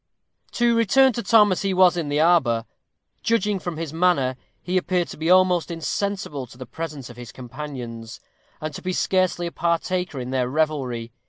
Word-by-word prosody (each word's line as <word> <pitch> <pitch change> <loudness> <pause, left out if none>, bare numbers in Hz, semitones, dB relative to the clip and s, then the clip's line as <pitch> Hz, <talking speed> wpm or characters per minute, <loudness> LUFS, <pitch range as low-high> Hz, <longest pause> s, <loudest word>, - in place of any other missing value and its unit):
To 240 -1 +2
return 255 +4 +4
to 235 - -3
Tom 215 -4 +5
as 185 - 0
he 195 -1 0
was 180 -1 +5
in 165 -4 -2
the 145 +1 0
arbor. 135 -9 +3 0.6
Judging 210 -3 +1
from 175 -3 -5
his 160 -2 -5
manner, 160 -7 +2 0.2
he 180 - -4
appeared 180 -1 0
to - - -9
be 160 +2 -2
almost 180 -2 +4
insensible 170 -4 -3
to 120 - -15
the 130 - -8
presence 145 -2 -7
of 120 - -15
his 120 -1 -9
companions, 125 -3 -8 0.4
and 155 -1 -5
to - - -7
be 185 0 -2
scarcely 185 -1 +1
a 170 - -4
partaker 170 -1 -1
in 125 0 -5
their 125 -2 0
revelry. 130 -6 -1
165 Hz, 185 wpm, -23 LUFS, 130-185 Hz, 0.6 s, Tom